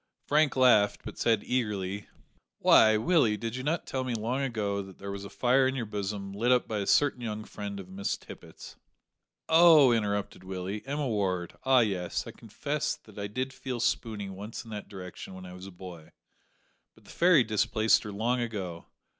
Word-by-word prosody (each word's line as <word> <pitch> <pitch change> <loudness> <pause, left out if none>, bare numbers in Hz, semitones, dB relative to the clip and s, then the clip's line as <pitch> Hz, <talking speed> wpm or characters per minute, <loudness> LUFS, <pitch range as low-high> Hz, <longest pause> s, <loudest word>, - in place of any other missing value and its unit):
Frank 150 0 +3
laughed, 125 -6 +4
but - - -8
said 115 -3 +2
eagerly 105 -5 -2 0.5
"Why. 110 -1 +6
Willie, 115 -5 +3
did 115 +2 -4
you 130 - -4
not 155 +5 -1
tell 130 -1 -3
me 125 -2 -2
long 120 +5 -2
ago 105 -6 -1
that 95 -1 -12
there 100 0 -6
was 100 0 -6
a 100 - -8
fire 130 +1 +3
in 130 - -1
your 120 -3 -2
bosom, 100 -1 -4
lit 115 +5 +1
up 125 -1 +3
by 110 -2 -2
a 100 - -3
certain 145 -4 +3
young 110 -2 -4
friend 100 -1 -7
of 95 - -9
Miss 95 +2 -3
Tippet's - - -12 0.4
" - - -57 0.2
"Oh," 160 -5 +7
interrupted 105 -4 -1
Willie, 95 +2 -5
"Emma 145 0 -2
Ward; 95 -6 -1
ah, 130 -1 +5
yes, 95 -6 -1
I - - -7
confess - - -3
that - - -14
I 100 - -3
did 130 +6 -4
feel 130 -2 -5
spooney 110 -3 -1
once 100 +5 -7
in 115 - -11
that 105 -1 -7
direction 95 -1 -9
when 95 0 -9
I 90 - -9
was 90 +1 -10
a - - -10
boy, 90 -3 -11 0.8
but - - -22
the - - -14
fairy 170 -6 +5
displaced 110 0 +2
her 105 - -7
long 120 +5 0
ago. 95 -8 -5
105 Hz, 195 wpm, -29 LUFS, 100-125 Hz, 0.8 s, Oh